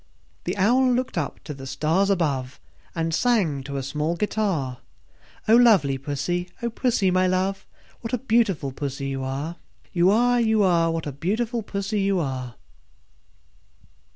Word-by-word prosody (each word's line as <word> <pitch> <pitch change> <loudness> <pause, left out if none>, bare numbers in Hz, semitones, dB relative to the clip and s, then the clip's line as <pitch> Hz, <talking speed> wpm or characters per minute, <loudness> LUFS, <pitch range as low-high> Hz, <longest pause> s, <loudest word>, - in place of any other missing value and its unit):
The - - -2
Owl 250 +6 +4
looked 255 +1 -1
up 160 -5 -3
to 150 - -6
the 135 -1 -9
stars 160 +8 +1
above, 140 -9 -1 0.4
And 165 -1 -1
sang 185 - +2
to 140 -1 -4
a 135 - -3
small 150 +5 -1
guitar, 175 - -1 0.7
"O 220 - +6
lovely 200 - +5
Pussy, 150 +6 -2
O 235 - -1
Pussy, 225 -5 +1
my 185 0 +3
love, 190 +1 -1 0.3
What 225 - -6
a 250 - +1
beautiful 220 - +1
Pussy 135 0 -4
you 135 -1 -3
are, 140 +6 -4 0.4
You 175 +1 +4
are, 245 +3 +3
You 220 -2 +3
are! 170 -3 +3
What 165 -1 -2
a 145 - -3
beautiful 220 - -1
Pussy 200 0 -2
you 195 -1 +1
are!" 130 -6 -4
180 Hz, 155 wpm, -24 LUFS, 140-215 Hz, 0.7 s, O